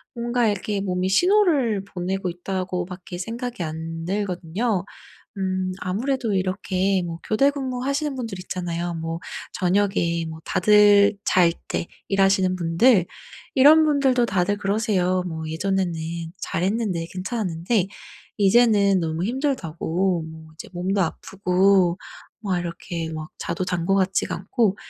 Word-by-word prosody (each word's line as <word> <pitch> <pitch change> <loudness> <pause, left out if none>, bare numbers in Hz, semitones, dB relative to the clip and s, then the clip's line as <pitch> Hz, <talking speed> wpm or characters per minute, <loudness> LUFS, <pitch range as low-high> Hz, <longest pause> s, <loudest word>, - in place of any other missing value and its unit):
뭔가 240 0 0
이렇게 205 0 -2
'몸이 185 -1 -1
신호를 285 - +3
보내고 190 0 -3
있다.'고 180 +1 -3
밖에 180 0 -8
생각이 235 +2 -4
안 165 +1 -5
들거든요. 190 +1 -1 0.6
음 185 -1 -1
아무래도 230 +4 -1
이렇게 190 0 0
뭐 165 -1 -5
교대 275 +6 +3
근무하시는 275 +1 -2
분들 230 -7 -5
있잖아요 175 -1 -3
뭐 165 0 -4 0.4
저녁에 180 -3 +1
뭐 160 0 -8
다들 205 0 +5
잘 175 -2 +4 0.2
때 - - -2 0.2
일하시는 195 -1 +3
분들 180 +4 +3 0.5
이런 300 +4 +7
분들도 270 -5 +3
다들 195 0 0
그러세요. 195 -3 +1
뭐 160 -2 -5
"예전에는 185 +2 -1 0.5
잘했는데 185 -1 -1
괜찮았는데 185 0 -1 0.5
이제는 200 -2 +4
너무 165 +1 -2
힘들다."고 190 - -1 0.3
이제 - - -10
"몸도 185 +3 -1
아프고 185 +1 +2 0.4
막 195 -4 -1
이렇게 170 -1 -5
막 155 +1 -6
자도 185 - -3
잔 180 -2 -2
것 195 - +3
같지가 190 0 0
않고." 200 +2 0
190 Hz, 285 characters per minute, -23 LUFS, 175-215 Hz, 0.6 s, 이런